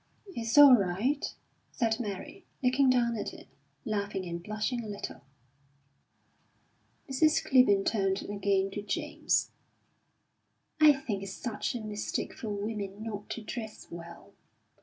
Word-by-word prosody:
"It's 230 +2 -1
all 285 -2 +11
right," 215 +7 +2 0.5
said 225 -2 0
Mary, 205 -5 -6 0.2
looking 255 +2 +4
down 240 -2 +3
at - - -4
it, - - -13 0.4
laughing 200 -2 -2
and 170 0 -5
blushing 215 +5 -2
a - - -7
little. 205 -1 -6 1.9
Mrs. 305 +4 +2
Clibborn 205 -7 +5
turned 195 -3 +1
again 200 -1 0
to 205 - -4
James. 205 -1 -1 1.3
"I 305 -1 +9
think 245 -8 -4
it's 195 -1 -6
such 235 0 -3
a 240 - -3
mistake 210 -1 -3
for 220 - -6
women 205 0 -4
not 210 -2 -6
to 225 - -5
dress 220 -1 -7
well. 170 0 -10
215 Hz, 130 wpm, -30 LUFS, 200-245 Hz, 1.9 s, all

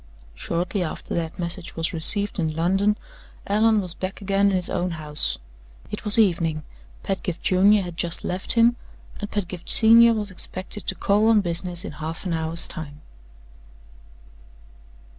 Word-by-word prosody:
Shortly 175 - -3
after 165 - -5
that 165 -2 -3
message 170 -1 -4
was 165 +1 -2
received 200 +5 +3
in 160 -2 -1
London, 195 +5 +1 0.5
Allan 215 +1 +2
was 180 -3 -4
back 185 +2 -6
again 200 0 +1
in 195 - 0
his 180 -1 -1
own 180 - -2
house. 150 -1 0 0.5
It 210 - -5
was 210 -1 +4
evening 165 -7 +1 0.4
Pedgift 185 -3 -4
Junior 195 +2 +4
had 175 -2 -8
just 170 -1 -1
left 185 +1 -2
him 235 +1 +4 0.4
and 205 - -5
Pedgift 180 -4 -5
Senior 230 +1 +6
was 210 -2 -2
expected 185 +2 -4
to 190 - -1
call 205 +3 +2
on 225 -2 +5
business 175 0 -1
in - - -6
half 155 +4 -7
an 180 - -2
hour's 160 +1 +2
time. 150 -4 -7
185 Hz, 155 wpm, -23 LUFS, 165-205 Hz, 0.5 s, Senior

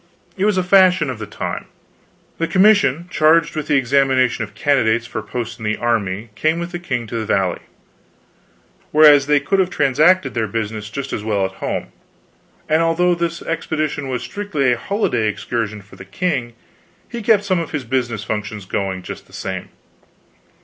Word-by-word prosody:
It 195 - 0
was 210 -2 +2
a 185 - +2
fashion 180 -5 +4
of 120 - -7
the 105 - -6
time. - - -5 0.7
The 165 - 0
Commission 185 -6 +3
charged 155 +1 +3
with 155 -1 -3
the - - +2
examination 130 -2 +2
of 105 0 -10
candidates 115 -3 +2
for 110 -1 -5
posts 120 +2 -5
in - - -9
the 110 0 -1
army 110 -2 -1
came 155 +10 0
with 170 +1 -4
the 175 - -4
king 125 -9 -3
to 115 +1 -5
the 110 - -3
Valley, 95 -4 0 1.3
whereas 145 -2 +7
they 145 -1 +4
could 195 +8 0
have 185 -1 +2
transacted 150 0 +3
their 110 -2 -1
business 110 0 -4
just 140 +4 -5
as 105 - -3
well 105 -3 0
at 95 - -4
home. - - -3 0.8
And 155 +1 +3
although 170 +2 +2
this 170 -1 -3
expedition 155 -3 -2
was 125 -2 -3
strictly 155 -11 -1
a - - -2
holiday 160 - 0
excursion 110 -1 -3
for 100 - -17
the - - -9
king, 125 - -2 0.5
he 235 -1 -6
kept 210 -1 +3
some 185 -3 +1
of 165 - -4
his 150 -4 -3
business 120 -3 -2
functions 105 -2 -4
going 95 -1 -3
just - - -8
the - - -21
same. - - -5
135 Hz, 180 wpm, -19 LUFS, 110-170 Hz, 1.3 s, whereas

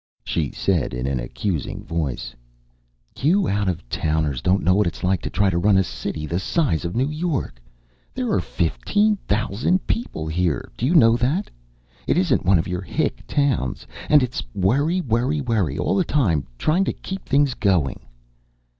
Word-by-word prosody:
She - - -1
said 85 -10 -1
in 60 +1 -3
an 70 -1 -1
accusing 80 - -3
voice: 70 -7 -3 0.9
"You 180 +7 +3
out 100 -1 +1
of 80 -9 -4
towners 75 -2 -1
don't 95 +2 +2
know 90 - +4
what 105 0 +3
it's - - -5
like 90 -1 +1
to - - -4
try 100 -1 +2
to 85 - 0
run 100 +2 +4
a 95 - +4
city 80 -3 -5
the 85 +3 -2
size 110 - 0
of 85 - -3
New 130 +5 +1
York. 150 - -3 0.5
There - - -1
are - - +2
fifteen 145 - +1
thousand 110 - 0
people 225 - -2
here, 80 0 -1
do 125 - -1
you 170 - +2
know 115 -7 +6
that? 140 - 0 0.6
It - - +2
isn't 180 - +2
one 95 0 +5
of 80 - -1
your 90 0 -3
hick 90 - -2
towns. 140 - 0 0.2
And 150 -3 +6
it's 125 0 -2
worry, 140 - +2
worry, 130 +3 0
worry 110 - 0
all - - 0
the 190 - +3
time, 90 - +1
trying 170 - +2
to - - -1
keep 190 -1 -7
things 140 -1 +3
going." 90 - +1
100 Hz, 180 wpm, -22 LUFS, -, 0.9 s, know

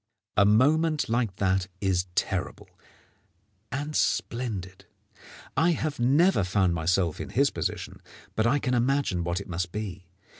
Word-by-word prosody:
A 100 - +5
moment 150 +8 +3
like 115 -4 0
that 95 -1 +1
is 95 -2 0
terrible - - -2 1.0
and 145 +3 -3
splendid. 100 -7 -2 0.7
I 165 +5 +3
have 155 -2 -3
never 140 - +4
found 90 -1 +1
myself 85 0 0
in - - -6
his - - +2
position, - - -4 0.3
but 110 +1 +2
I 145 - +3
can 125 -3 -1
imagine 125 -7 +1
what 85 +1 -1
it 100 - -9
must 90 0 -3
be. 100 -3 -6
105 Hz, 140 wpm, -27 LUFS, 90-135 Hz, 1.0 s, A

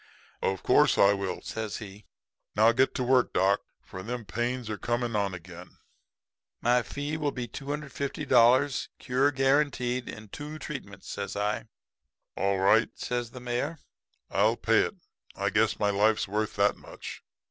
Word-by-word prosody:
"'Of 95 -1 -1
course - - +4
I 100 0 +6
will,' 100 -1 -3
says 110 -2 -4
he. 100 -3 -8
'And 105 +2 -16 0.5
now 110 +3 +6
get 130 +3 +2
to 130 - 0
work, 125 0 +3
doc, 95 +2 +3 0.2
for 95 - -8
them 115 +3 -5
pains 120 +5 -2
are 110 -2 -4
coming 120 -1 -1
on 100 -2 0
again.' 90 0 -12 0.8
"'My 125 +1 +3
fee 145 +5 -4
will 150 -2 0
be 125 -3 -4
$250.00, 140 -2 +1
cure 135 +2 +2
guaranteed 135 -2 +1
in 110 -1 -9
two 150 +7 -7
treatments,' 130 -10 -8
says 100 -1 -4
I. 105 +2 -1 0.7
"'All 100 0 +1
right,' 105 +4 +3
says 120 -1 -2
the 125 - -10
Mayor. 125 +6 -2 0.5
'I'll - - +3
pay - - +3
it. - - -6 0.4
I - - -1
guess - - +2
my 105 - +2
life's 105 +2 +2
worth 105 +2 -2
that 100 0 +3
much.' - - -9
120 Hz, 160 wpm, -28 LUFS, 100-130 Hz, 0.8 s, I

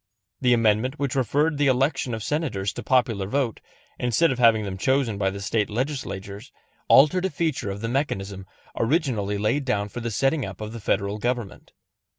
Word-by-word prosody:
The 125 -2 +3
amendment 115 +4 +1
which 140 -3 -2
referred 145 +4 +1
the 145 - +3
election 130 -1 +1
of 110 - -6
Senators 120 -11 -2
to - - -6
popular 115 -7 +1
vote, 125 0 -1 0.4
instead 125 +7 +2
of 130 - -3
having 115 -3 +5
them 100 -2 -4
chosen 120 0 0
by 95 -1 +2
the 100 +1 -6
State 105 +1 0
Legislatures, 110 -4 -4 0.4
altered 165 +7 +5
a - - +1
feature 155 - -2
of 100 +1 -5
the 115 - -2
mechanism 100 -7 -2 0.3
originally 115 - 0
laid 110 +8 0
down 105 -6 -1
for 120 - -6
the 115 0 -3
setting 135 +6 +1
up 95 -3 -7
of 110 +1 -6
the 115 - -6
Federal 100 0 -1
government. 120 -3 -3
115 Hz, 180 wpm, -24 LUFS, 105-135 Hz, 0.4 s, having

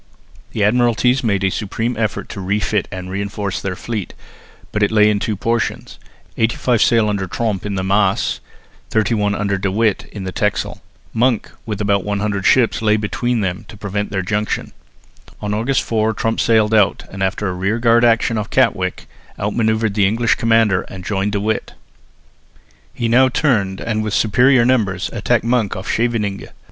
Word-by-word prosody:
The 110 - -2
Admiralties 120 +3 +2
made 100 -4 0
a 95 - +2
supreme 115 +4 -2
effort 110 -2 -2
to 100 - -6
refit 100 +1 0
and 95 -1 -6
reinforce 100 0 -3
their 95 -1 -3
fleet, 110 -1 -5 0.6
but 105 - -2
it 105 - +3
lay 105 -1 +4
in 105 - 0
two 105 +1 -2
portions; 115 +3 -2 0.4
eighty 115 +1 +1
five 120 -3 +1
sail 115 -2 +4
under 100 -2 -1
Tromp 105 0 -2
in 100 - -3
the 95 - -2
Maas, 100 +3 +1 0.5
thirty 110 0 +1
one 105 -2 +1
under 100 -2 -1
De 95 0 -1
With 105 0 0
in 100 - -8
the 95 - -4
Texel. 105 +2 -2 0.3
Monk 120 -1 +1 0.2
with 105 -2 -3
about 100 -2 +1
100 100 0 -1
ships 120 -4 +3
lay 110 -1 +3
between 115 +3 -1
them 95 +2 -2
to 105 - -12
prevent 105 0 -3
their 95 -2 -2
junction. 105 +2 -2 0.7
On 105 0 -3
August 115 +6 0
4 110 -1 0
Tromp 115 +2 -1
sailed 110 -2 +3
out 105 -2 +3
and, 95 - -7
after 95 +2 -1
a 95 - -2
rearguard 115 +6 +2
action 115 -1 +3
off 105 - -5
Katwijk, - - +1 0.3
out 105 +1 -2
manoeuvred 110 -2 +1
the 100 -2 +3
English 115 +3 +2
commander 115 -5 +2
and 95 -1 -9
joined 100 0 -1
De 100 - 0
With. 110 +2 -2 1.2
He 120 - -2
now 130 +3 +5
turned 105 -9 +1
and 110 -2 -2
with 105 -1 -2
superior 125 +3 +4
numbers 105 -7 +1
attacked 115 +2 +1
Monk 115 -4 0
off 95 +2 -7
Scheveningen. 110 -4 -1
105 Hz, 175 wpm, -18 LUFS, 100-115 Hz, 1.2 s, now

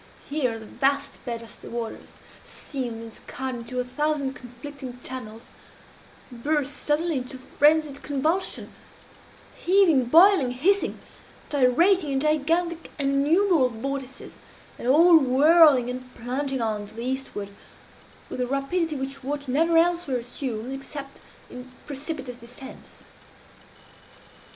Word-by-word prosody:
Here 255 -6 -1
the 220 - -10
vast 275 +5 -1
bed 235 -2 -4
of 225 - -12
the - - -10
waters, 235 -1 -6 0.3
seamed 245 -5 -6
and 225 -1 -10
scarred 260 0 -6
into 245 +1 -5
a - - +1
thousand 280 +1 -1
conflicting 250 +1 -9
channels, 230 -3 -7 0.8
burst 285 +3 -1
suddenly 310 +1 0
into 255 +1 -8
frenzied 295 +2 +2
convulsion 310 +6 -1 0.8
heaving, 345 -8 +4
boiling, 320 -1 +6
hissing 385 +11 +1 0.5
gyrating 295 +4 +3
in 270 - +1
gigantic 325 +3 0
and 275 0 +1
innumerable 335 -6 +4
vortices, 270 +3 -6 0.4
and - - -5
all 325 +5 +7
whirling 280 0 +6
and 255 0 -6
plunging 260 +2 -2
on 215 -2 -2
to 215 - -14
the 230 +1 -5
eastward 255 -6 -4 0.8
with 255 - -5
a 250 - 0
rapidity 300 +5 -1
which 270 0 -5
water 285 0 -3
never 330 +4 +3
elsewhere 340 -5 +2
assumes, 245 0 -4
except 275 0 -8 0.3
in 250 +1 -10
precipitous 275 -3 -5
descents. 245 +3 -12
275 Hz, 120 wpm, -25 LUFS, 250-305 Hz, 0.8 s, all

